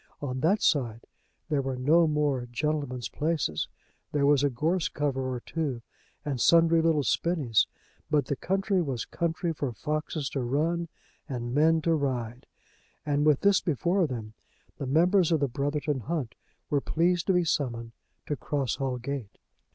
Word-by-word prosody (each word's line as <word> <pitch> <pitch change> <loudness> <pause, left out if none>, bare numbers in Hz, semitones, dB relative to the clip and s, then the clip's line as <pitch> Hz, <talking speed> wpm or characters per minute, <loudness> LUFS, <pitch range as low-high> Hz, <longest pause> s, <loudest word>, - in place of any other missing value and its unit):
On 130 -3 -3
that 190 +9 +2
side 120 -7 +1 0.5
there 145 -3 +1
were 135 -1 -3
no 160 +6 +4
more 145 -5 0
gentlemen's 130 -2 -2
places; 150 - -1 0.4
there 145 -1 +2
was 145 -1 +4
a 145 - +4
gorse 160 +8 0
cover 135 -3 -1
or 125 -1 -4
two 140 -7 -3 0.4
and 135 -5 -2
sundry 165 0 +5
little 160 -3 +2
spinnies; 145 -9 +2 0.4
but 150 -3 +2
the 140 - -1
county 195 +5 0
was 135 -7 -2
a - - -17
country 165 0 -1
for 145 -4 -3
foxes 150 - -3
to 140 - -2
run 160 +7 0 0.4
and 120 -2 -4
men 160 +2 +3
to 165 - +3
ride; 125 -5 -2 0.6
and 145 0 +1
with 150 -3 +4
this 200 -1 +4
before 175 +3 +1
them, 110 -5 -6 0.5
the 140 - -3
members 175 +5 +3
of 160 - +3
the 140 - +1
Brotherton 145 +2 -1
Hunt 140 -2 -3 0.4
were 145 -1 +2
pleased 170 +3 +1
to 190 - +4
be 180 -1 +3
summoned 120 -7 -1 0.3
to 145 - -2
Cross 140 -4 -2
Hall 135 -2 -1
Gate. 125 -3 -5
145 Hz, 165 wpm, -28 LUFS, 130-165 Hz, 0.6 s, sundry